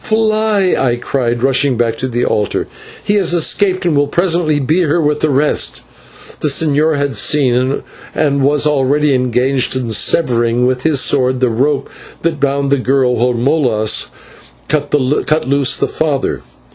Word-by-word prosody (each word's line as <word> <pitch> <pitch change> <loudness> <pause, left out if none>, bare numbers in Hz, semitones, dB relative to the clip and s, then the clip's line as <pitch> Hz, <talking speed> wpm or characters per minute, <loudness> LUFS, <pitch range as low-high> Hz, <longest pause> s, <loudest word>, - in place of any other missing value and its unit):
"Fly," 215 -3 +1
I 125 -3 0
cried, 120 -1 -2
rushing 135 -1 +1
back 115 -1 0
to 130 - -2
the 120 -1 -2
altar, 105 -1 -1 0.4
"he 205 - 0
has 185 -4 +1
escaped, 185 +2 +1
and 170 -4 +1
will 145 0 +2
presently 170 -2 0
be 150 +5 0
here 170 -2 +1
with 150 -2 0
the 155 - 0
rest." 145 +2 0 0.6
The - - -1
señor 150 +1 +1
had 140 -1 -2
seen, 130 -2 +1 0.3
and 140 -2 0
already 145 0 +1
was 135 - +2
engaged 125 +1 0
in 125 -3 -3
severing 120 -2 +1
with 125 0 -1
his 145 -2 +2
sword 130 -2 +1
the 125 -1 +1
rope 135 +5 -1 0.4
that 165 -2 -1
bound 140 0 -1
the 140 - +3
girl, 130 -1 +1
while 125 +2 +1
Molas 120 -4 0 0.6
cut 145 -1 -1 0.6
loose 140 -1 +1
her - - +1
father. 150 -4 -2
140 Hz, 160 wpm, -14 LUFS, 125-155 Hz, 0.6 s, the